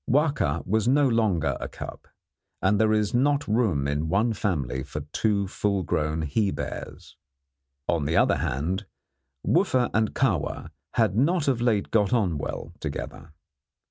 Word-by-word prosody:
Wahka 135 - +1
was 110 +4 +1
no 140 +2 +4
longer 95 - +1
a - - -4
cub, - - -9 0.5
and 100 +2 +2
there 110 -1 +3
is 105 -1 +1
not 145 +3 +2
room 105 - +1
in 75 +3 -1
one 110 +6 +2
family 70 - -1
for 75 +3 -6
two 100 -3 +1
full 100 0 -1
grown 80 0 -1
he 100 +7 +1
bears. 70 -4 -6 0.7
On 80 -4 +1
the 80 +3 +1
other - - +4
hand, 90 +10 -2 0.6
Wooffa 125 -2 +2
and 110 -1 +1
Kahwa - - 0 0.2
had 110 -6 +2
not 155 +6 +2
of 130 -4 +1
late 110 -5 +1
got 105 0 +2
on 95 -10 +1
well - - -5
together. 80 - -6
105 Hz, 150 wpm, -26 LUFS, 80-115 Hz, 0.7 s, no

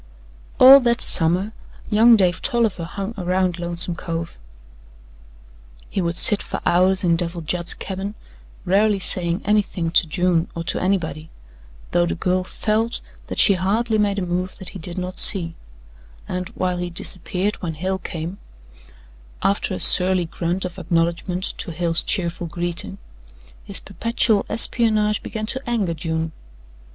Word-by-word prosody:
All 270 +2 +10
that 235 -2 0
summer 180 +6 +3 0.4
young 230 +2 +6
Dave 185 -3 +1
Tolliver 220 -8 0
hung 200 +5 -6
around 180 -1 -1
Lonesome 175 0 -3
Cove. 165 - -6 1.5
He 195 - -1
would 170 0 -2
sit 210 -5 +6
for - - -5
hours 185 +2 +2
in 170 -2 +3
Devil 170 0 -2
Judd's 170 +2 +1
cabin, 195 +2 -6 0.5
rarely 205 +3 +2
saying 180 -2 0
anything 195 -5 0
to 170 - +4
June 175 0 0
or 165 - -4
to - - -2
anybody, 170 -4 -2 0.6
though 175 0 +2
the - - -2
girl 185 +1 -1
felt 220 +4 -2 0.3
that - - -6
she 200 - +5
hardly 215 +5 0
made 205 -1 0
a 190 - -2
move 180 +1 -3
that 190 - -9
he 195 - -10
did 170 +2 -5
not 185 0 -5
see, 170 -4 +4 0.7
and 180 0 -4
while 180 -1 -1
he 175 0 -4
disappeared 185 +3 -1
when 165 -3 -5
Hale 190 +4 -3
came, 170 +2 -6 1.0
after 200 +1 0
a - - -6
surly 185 -1 +5
grunt 175 +3 -3
of 180 +1 -7
acknowledgment 170 +1 -1 0.2
to - - -3
Hale's 170 0 0
cheerful 175 -3 -2
greeting, 170 - -4 0.7
his - - +1
perpetual 230 -2 0
espionage 215 -3 +3
began 215 -1 -5
to 260 +4 -4
anger 205 -8 -1
June. 160 0 -3
180 Hz, 145 wpm, -21 LUFS, 170-200 Hz, 1.5 s, All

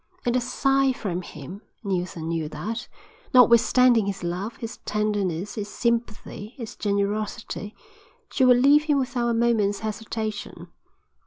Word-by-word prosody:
At 240 0 +1
a 255 - +2
sign 270 +1 +2
from 185 -6 -3
him, 180 +3 -9 0.2
Neilson 180 -4 -3
knew 165 -2 -2
that, 215 +11 -5 0.5
notwithstanding 240 -2 +6
his 195 -2 -4
love, 185 +6 -3
his 230 +1 -7
tenderness, 205 -3 -2
his 210 -1 -5
sympathy, 230 -1 -2
his 230 -4 -7
generosity, 205 +1 -2 0.6
she 265 - +1
would 250 -1 +7
leave 285 +4 +5
him 295 -2 +2
without 250 -2 -1
a - - +1
moment's 225 -4 +2
hesitation. 220 0 -5
215 Hz, 135 wpm, -25 LUFS, 200-240 Hz, 0.6 s, would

